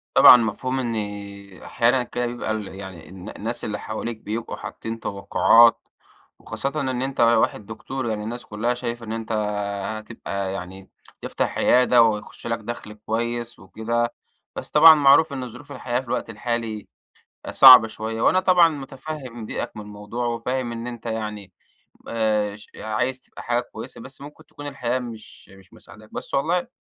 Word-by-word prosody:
طبعًا - - +10
مفهوم 125 +3 -2
إن 120 -3 -2 0.7
أحيانًا 125 +2 +1
كده 120 0 -3
بيبقى 120 -2 -3
ال 110 -2 -3
يعني 95 -4 -10
الن 95 +2 -10
الناس 115 +3 -5
اللي 105 -1 -3
حواليك 110 +1 -5
بيبقوا 110 +2 -5
حاطين 115 0 -7
توقّعات 115 +4 +4 0.5
وخاصةً 140 - -4
إن 130 -2 -2
أنت 135 0 -4
واحد 115 -2 +3
دكتور 120 +4 -5
يعني 105 -1 -3
الناس 120 +3 -6
كلها 115 +3 -1
شايفة 120 -1 -5
إن 110 - -5
أنت 115 0 -5 0.7
هتبقى 100 -3 -5
يعني 95 0 -8 0.3
تفتح - - -2
عيادة، 125 -1 +5
وهيخش 110 0 -2
لك 115 0 -1
دخل 110 -1 -7
كويس 115 +2 -3
وكده، 115 +5 -2 0.4
بس - - -6
طبعًا 160 +1 +9
معروف 145 +1 +5
إن 130 -2 -4
ظروف 145 +5 -13
الحياة 125 -2 -2
في 130 - -10
الوقت 120 -1 -2
الحالي 115 -1 -4 0.6
صعبة 130 -4 +9
شوية، 110 +1 -5
وأنا 185 - +4
طبعًا 180 -3 +5
متفهم 135 -4 -7
ضيقك - - -4
من 105 - -5
الموضوع 105 +3 -6
وفاهم 120 +1 -2
إن 115 +1 -5
أنت 120 -2 -8
يعني، 105 -4 -5 0.6
آآ، 105 -2 0
ش 105 - -16
عايز 125 +4 -2
تبقى - - -11
حاجة 120 0 0
كويسة 110 - -8
بس 130 +3 -10
ممكن 150 +2 -12
تكون 145 -1 -10
الحياة 130 -3 -2
مش 115 -4 -10
مش 95 +1 -18
مساعداك، 110 -1 -16
بس - - -6
والله 165 - +1
115 Hz, 160 wpm, -23 LUFS, 110-125 Hz, 0.7 s, طبعًا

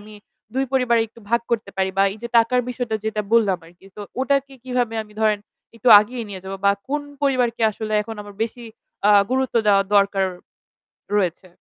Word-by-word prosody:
আমি 210 +1 -13 0.4
২ 265 +1 +1
পরিবারেই 235 -3 +2
একটু 230 +2 -18
ভাগ 235 - +3
করতে 225 -4 -1
পারি? 190 0 0
বা - - +6
এই 215 - -11
যে 235 - -4
টাকার 250 +2 +3
বিষয়টা 245 -3 -2
যেটা 220 -1 -1
বললাম 210 -6 +3
আরকি। 175 +3 -19
তো - - -8 0.2
ওটাকে 275 0 0
কিভাবে 245 -3 -1
আমি 210 -1 -18
ধরেন 215 -1 +3 0.4
একটু 230 +2 0
আগিয়ে 235 +3 -5
নিয়ে 190 -2 -7
যাব 190 - -6
বা 200 - +6 0.2
কোন 295 +1 -1 0.2
পরিবারকে 250 -4 +1
আসলে 215 +1 -6
এখন 225 +1 -7
আমার 205 -1 -12
বেশি 235 +2 -4 0.5
আ - - +7 0.2
গুরুত্ব 260 -1 0
দেওয়া 200 -1 +5
দরকার 200 -1 +3 0.9
রয়েছে? 185 -1 -1
225 Hz, 185 wpm, -22 LUFS, 205-250 Hz, 0.9 s, আ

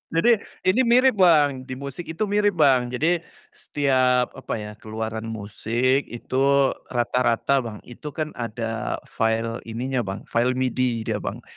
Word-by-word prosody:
Jadi, 225 +5 +4 0.2
ini 190 +8 +3
mirip, 250 -2 +4
Bang, 145 -7 +4
di 130 - -5
musik 140 +5 -7
itu 165 +7 -2
mirip, 205 -1 +1
Bang, 135 -6 +4
jadi 160 +8 +1 0.3
setiap 130 -3 +1
apa 130 - -5
ya 105 -1 -6
keluaran 110 0 -5
musik 115 +5 -1
itu 120 +2 -7 0.5
rata-rata, 120 +2 +1
Bang. 115 -4 -6
Itu 140 +4 -9
kan 155 -1 -3
ada 115 -1 -3
file 115 +1 -1
ininya, 125 +3 -2
Bang, 95 0 -4
file 120 +2 0
MIDI 125 -2 0
dia, - - -2
Bang, - - -6
130 Hz, 145 wpm, -24 LUFS, 115-150 Hz, 0.5 s, Jadi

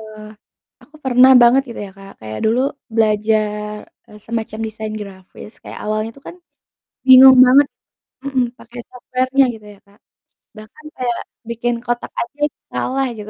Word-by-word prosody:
eee, 215 -1 -12 0.6
aku 300 - -31
pernah 260 +1 +5
banget 250 +3 +5
gitu 235 - -8
ya 195 - -12
Kak 195 0 -13
kayak 110 0 -7
dulu 225 +3 +2 0.4
belajar, 210 -1 0 0.3
eee, 210 0 -15
semacam 225 -1 -5
desain 220 0 -7
grafis. 195 +2 -12
Kayak - - -9
awalnya 215 +1 -2
tuh 275 - -18
kan 345 - -10 0.7
bingung 260 0 +9
banget 275 +3 +5 0.6
mhm, 265 -2 0 0.2
pake 235 +2 -15
software-nya 255 +2 0
gitu 215 -1 -14
ya 195 - -24
Kak, 200 +3 -26 0.6
bahkan 220 +8 -15
kayak 245 -2 -2 0.3
bikin 235 +1 -2
kotak 240 0 -3
aja 240 +5 -7
itu 300 - -23
salah 270 +1 -2
gitu. 210 0 -9
225 Hz, 155 wpm, -18 LUFS, 215-255 Hz, 0.7 s, bingung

